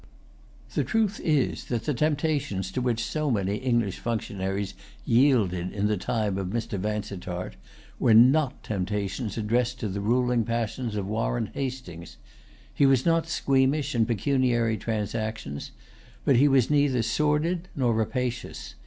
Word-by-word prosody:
The - - +1
truth 220 -2 0
is 150 -5 +1
that 115 -2 -2
the 150 - 0
temptations 145 - 0
to 130 - -2
which 120 -2 0
so 155 -1 -1
many 100 -4 0
English 120 -6 0
functionaries 100 -3 -3 0.3
yielded 115 -9 +3
in 100 0 -1
the 105 0 +2
time 105 0 -1
of 95 - -3
Mr. 115 0 -3
Vansittart 100 - -4 0.5
were 115 - +5
not 135 +4 +5
temptations 105 +2 -3
addressed 120 +3 0
to 110 - -1
the 100 0 -3
ruling 120 +2 +2
passions 115 0 -2
of 100 -2 -2
Warren - - -1
Hastings. 125 -11 -6 0.6
He 140 - +4
was 135 -2 +3
not 165 -1 +2
squeamish 135 -1 +1
in 115 -2 +2
pecuniary 120 -1 +1
transactions; 110 -8 -3 0.6
but - - +4
he 140 +4 +6
was 135 -2 +3
neither 140 -5 +3
sordid 150 +8 0
nor 125 -4 +2
rapacious. 120 +2 -3
115 Hz, 140 wpm, -26 LUFS, 105-135 Hz, 0.6 s, he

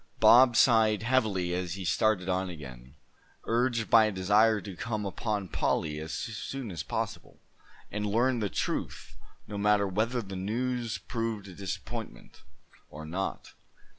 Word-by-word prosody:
Bob 125 0 +7
sighed 110 -3 +4
heavily 110 -8 +1
as 90 -1 -2
he 95 -1 -6
started 100 0 +1
on 95 0 0
again, 65 -5 -10 0.5
urged 115 -1 0
by 115 -1 +7
a 110 - 0
desire 105 +3 +3
to 100 -2 -8
come 110 +1 -3
upon 100 0 -2
Polly 75 -3 -1
as 80 +1 -6
soon 115 +1 -5
as 85 - -4
possible, - - -5 0.5
and 105 0 -2
learn 120 +4 +2
the 105 -2 -1
truth, - - -3 0.3
no 105 - -5
matter 105 0 +3
whether 110 +5 -1
the 95 -1 -8
news 115 +4 -2
proved 115 -4 -4
a 95 - -10
disappointment, 95 +1 -7 0.5
or 75 +1 -9
not. 95 +5 -4
105 Hz, 145 wpm, -29 LUFS, 95-115 Hz, 0.5 s, Bob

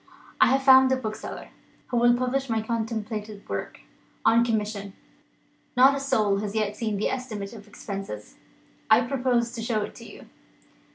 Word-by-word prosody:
I - - +8
have 270 +1 +2
found 265 -1 +7
a - - +4
bookseller, 220 -4 -6 0.4
who 245 - -1
will 240 0 +5
publish 255 +1 -1
my 225 -1 +1
contemplated 220 -2 -4
work, - - -5 0.4
on 230 +1 +5
commission. 210 -3 -2 0.8
Not 265 +2 +7
a 275 - -2
soul 215 -7 +1
has 205 0 -4
yet 210 -1 0
seen 215 -2 -2
the 205 - 0
estimate 220 -5 -5
of 215 -2 -12
expenses. 195 - -7 0.6
I 220 +2 +7
propose 245 -2 0
to 235 -2 -6
show 225 -2 -1
it - - -7
to - - -12
You." - - -14
225 Hz, 165 wpm, -26 LUFS, 210-250 Hz, 0.8 s, I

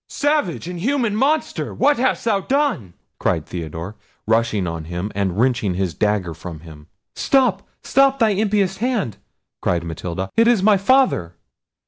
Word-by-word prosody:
"Savage, 290 - 0
inhuman 215 +5 -1
monster, 285 +7 0
what 290 0 +3
hast 260 -1 0
thou 215 -4 +2
done!" 205 - -1 0.2
cried 80 -3 0
Theodore, 85 +3 -6 0.3
rushing 110 -3 +1
on 85 -2 -4
him, 90 +5 -4
and 95 -2 -1
wrenching 120 -7 +1
his 95 -2 -1
dagger 100 -1 0
from 80 -2 -9
him. 75 -3 -13 0.3
"Stop, 250 -8 +2 0.2
stop 275 +1 +3
thy 225 -4 +3
impious 200 -2 +1
hand!" 215 - -1 0.4
cried 85 -2 0
Matilda; 85 +3 -5
"it 230 0 +4
is 235 -6 +3
my 210 -1 +5
father!" 195 - +2
130 Hz, 145 wpm, -20 LUFS, -, 0.4 s, my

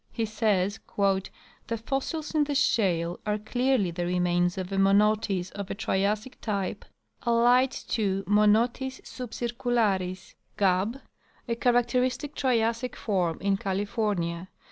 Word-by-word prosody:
He 230 - -1
says: 210 -2 0
" - - -27
The 195 +3 -2
fossils 275 +7 -3
in 305 -2 +3
the 290 0 -2
shale 175 - +1
are 210 -1 0
clearly 245 -2 +1
the 175 +1 -3
remains 175 0 +1
of 185 0 -4
a 195 - -1
Monotis 200 -1 +2
of 200 -1 -6
a - - -3
Triassic 210 +3 -1
type, 200 -4 -3 0.4
allied 245 +2 +4
to 195 -6 -2
M. 200 - -1
suhcircularis, 235 -3 0 0.2
Gabb, 200 +6 +1 0.5
a 235 - 0
char 245 +1 +2
acteristic 250 +3 +1
Triassic 235 -1 0
form 180 -6 -1
in 195 0 +1
California. 195 -3 -2
210 Hz, 125 wpm, -27 LUFS, 190-240 Hz, 0.5 s, allied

